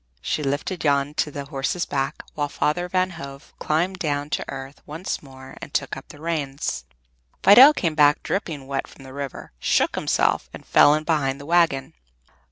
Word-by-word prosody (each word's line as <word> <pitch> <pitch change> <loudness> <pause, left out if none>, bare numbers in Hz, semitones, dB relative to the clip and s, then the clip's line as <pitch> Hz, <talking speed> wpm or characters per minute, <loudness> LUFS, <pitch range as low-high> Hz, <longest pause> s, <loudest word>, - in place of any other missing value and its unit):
She - - -1
lifted 145 +6 -2
Jan 140 -1 +1
to 150 - 0
the 140 -1 -6
horse's 140 +4 -2
back, 135 -1 -2
while 145 -1 -2
Father 175 +5 -1
Van 185 0 +1
Hove 140 -4 -10
climbed 175 +5 0
down 145 -2 -2
to - - -1
earth 135 +1 -8
once 160 +5 -4
more 130 -2 -13
and - - -8
took - - -1
up - - -10
the 145 - -13
reins. 140 - -3 0.6
Fidel 255 +9 +10
came 170 - -1
back 150 -1 +4
dripping 155 -9 -3
wet 135 0 -3
from 135 - -15
the 130 0 -11
river, 140 -1 -6
shook - - +2
himself, - - +1
and - - -12
fell 145 - +6
in 155 - -2
behind 145 -4 0
the 140 - -10
wagon. 165 -5 +2
145 Hz, 180 wpm, -23 LUFS, 140-165 Hz, 0.6 s, Fidel